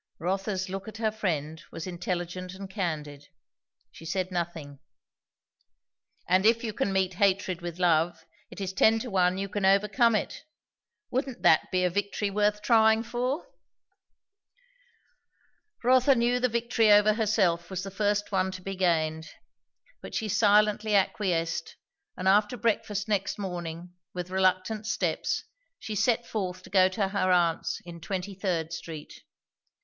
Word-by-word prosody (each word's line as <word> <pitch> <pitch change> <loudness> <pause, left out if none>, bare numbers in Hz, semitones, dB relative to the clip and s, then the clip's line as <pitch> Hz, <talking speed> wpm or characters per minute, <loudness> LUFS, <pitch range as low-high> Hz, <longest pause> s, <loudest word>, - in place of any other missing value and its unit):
Rotha's 190 +2 -2
look 195 +2 -6
at 220 - -8
her 220 -1 0
friend 160 -7 -3
was 165 - -6
intelligent 180 0 -4
and 195 +1 -8
candid. 155 -7 -4 0.6
She - - -14
said 185 +3 -2
nothing. 165 -5 -4 1.5
"And 185 +2 +3
if 230 +2 +3
you 220 -2 -3
can 200 - -1
meet 190 -1 +1
hatred 190 -2 +2
with 175 -1 -6
love, 170 -2 +1 0.2
it - - -11
is 190 -1 -3
ten 220 +4 +4
to 245 - -6
one 185 -1 +2
you 195 0 -2
can 200 0 -4
overcome 210 +4 +4
it. 210 - -3 0.7
Wouldn't 260 -1 -3
that 160 - +4
be 185 0 +1
a 180 - +2
victory 200 +1 -2
worth 210 +1 +1
trying 220 -1 +4
for?" 250 - -2 2.4
Rotha 255 +2 +5
knew 240 +1 +2
the 250 0 +1
victory 230 -1 +2
over 210 +1 +6
herself 205 -6 +1
was 185 -1 -4
the 195 - -6
first 205 +1 0
one 190 -1 +1
to 185 - -8
be 195 +1 -4
gained. 160 -3 0 0.7
But - - -8
she 220 - -1
silently 210 +1 +3
acquiesced; 175 -4 0 0.4
and 185 - -2
after 210 +5 +3
breakfast 210 -3 -1
next 200 -3 -1
morning, 175 -3 -6 0.2
with 180 0 -5
reluctant 190 +3 +1
steps, 225 - -1 0.3
she 215 - -6
set 230 +3 +1
forth 185 -4 -4
to - - -14
go 185 -1 +5
to 195 0 -1
her 190 -2 +1
aunt's 170 -2 +1
in 170 -1 -10
Twenty 190 +3 -4
third 175 -4 -2
Street. 160 -2 -8
195 Hz, 150 wpm, -28 LUFS, 180-215 Hz, 2.4 s, over